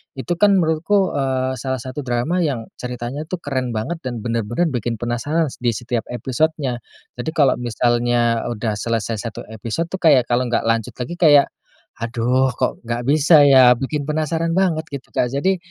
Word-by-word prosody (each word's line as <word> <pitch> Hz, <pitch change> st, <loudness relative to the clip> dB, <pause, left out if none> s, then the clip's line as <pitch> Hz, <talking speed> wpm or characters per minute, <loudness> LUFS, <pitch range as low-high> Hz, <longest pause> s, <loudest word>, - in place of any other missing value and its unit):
itu 135 Hz, +6 st, -6 dB
kan 205 Hz, -1 st, +5 dB
menurutku, 170 Hz, +5 st, +1 dB
eee, 130 Hz, -1 st, -1 dB
salah 130 Hz, 0 st, -3 dB
satu 130 Hz, +2 st, -6 dB
drama 125 Hz, +9 st, 0 dB
yang 140 Hz, -10 st, -1 dB
ceritanya 125 Hz, +4 st, -5 dB
tuh 175 Hz, +1 st, -5 dB
keren 130 Hz, -4 st, -2 dB
banget 110 Hz, +11 st, -3 dB
dan 120 Hz, -3 st, -4 dB
benar-benar 115 Hz, +8 st, -1 dB
bikin 120 Hz, -2 st, -2 dB
penasaran 140 Hz, +7 st, -1 dB
s -, -, -12 dB
di 120 Hz, -2 st, 0 dB
setiap 120 Hz, 0 st, -3 dB
episodenya. 130 Hz, +1 st, -1 dB, 0.4 s
Jadi 160 Hz, +6 st, -4 dB
kalau 140 Hz, -7 st, +3 dB
misalnya 120 Hz, 0 st, +1 dB
udah 110 Hz, -3 st, -2 dB
selesai 115 Hz, 0 st, -2 dB
1 115 Hz, -, -5 dB
episode 115 Hz, +10 st, -4 dB
tuh 190 Hz, -, -4 dB
kayak 140 Hz, -9 st, +4 dB
kalau 125 Hz, +1 st, +2 dB
nggak 120 Hz, -, 0 dB
lanjut 115 Hz, -1 st, -1 dB
lagi 130 Hz, +8 st, -6 dB
kayak, 145 Hz, -5 st, +5 dB, 0.5 s
"Aduh, 120 Hz, +2 st, 0 dB
kok -, -, -1 dB
nggak 120 Hz, +1 st, -2 dB
bisa 155 Hz, +1 st, +6 dB
ya." 130 Hz, -3 st, +7 dB
bikin 135 Hz, +4 st, -3 dB
penasaran 160 Hz, +2 st, -1 dB
banget 170 Hz, -4 st, +1 dB
gitu 140 Hz, -, -7 dB
Kak. 125 Hz, +1 st, -1 dB
Jadi, 185 Hz, +7 st, +1 dB
130 Hz, 170 wpm, -20 LUFS, 120-155 Hz, 0.5 s, ya